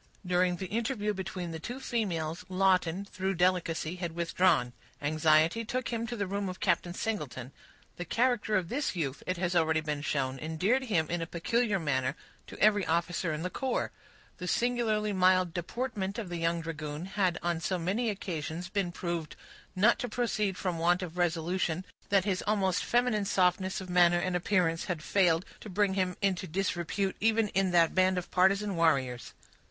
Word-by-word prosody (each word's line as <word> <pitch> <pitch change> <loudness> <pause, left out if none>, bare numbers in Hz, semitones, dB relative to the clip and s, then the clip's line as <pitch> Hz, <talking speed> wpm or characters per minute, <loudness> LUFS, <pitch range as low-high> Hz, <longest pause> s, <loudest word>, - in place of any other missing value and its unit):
During 180 0 +2
the 190 - -5
interview 215 +1 -1
between 185 -2 -5
the 160 - -5
two 245 +10 -6
females, 175 -11 -2
Lawton, 185 -1 +2
through 190 -1 -2
delicacy, 175 -1 +1
had 175 -2 -4
withdrawn. 170 -6 +2 0.3
Anxiety 155 +7 +3
took 250 +3 -3
him 230 -1 -2
to 240 - -4
the 205 -3 -1
room 200 0 -2
of 185 - -7
Captain 175 -1 0
Singleton. 145 - -4 0.5
The 175 - -4
character 235 +1 +1
of 185 -3 +1
this 260 - -2
youth, 145 -6 -2
it 185 - -1
has 175 0 -1
already 160 -1 +3
been 150 -2 -3
shown, 135 -2 -1
endeared 185 - 0
him 170 -9 +1
in 175 0 -1
a 165 - -3
peculiar 210 +5 0
manner 135 -5 0 0.3
to - - -10
every 205 -1 +4
officer 170 +1 0
in 155 +1 -3
the 180 - -3
corps. 260 -2 -1 0.5
The 180 - -5
singularly 220 -1 +1
mild 185 -2 +3
deportment 200 +2 -3
of 215 -6 -4
the 175 - -3
young 165 0 0
dragoon 155 -1 -5
had 185 -2 0
on 170 -1 0
so 185 +3 -1
many 200 +8 0
occasions 175 -3 -4
been 195 -3 -1
proved 170 -3 -4 0.4
not 215 +6 +4
to 245 - -3
proceed 215 -4 -1
from 180 -3 -2
want 175 +2 +2
of 175 -2 -6
resolution 175 0 0 0.2
that 195 -2 +3
his 190 -3 0
almost 195 -4 +1
feminine 240 -4 +1
softness 185 0 +1
of 190 - -7
manner 175 -1 +5
and 180 +1 -1
appearance 175 -2 +1
had 170 -4 -3
failed 180 -2 +2
to 215 - -9
bring 200 +1 +1
him 185 -2 -1
into 190 -2 +1
disrepute, 190 +2 -1
even 225 0 +2
in 195 -1 +1
that 170 -2 +4
band 185 0 +3
of 180 - -4
partisan 195 +2 +3
warriors. 135 -7 +1
180 Hz, 180 wpm, -30 LUFS, 165-200 Hz, 0.5 s, manner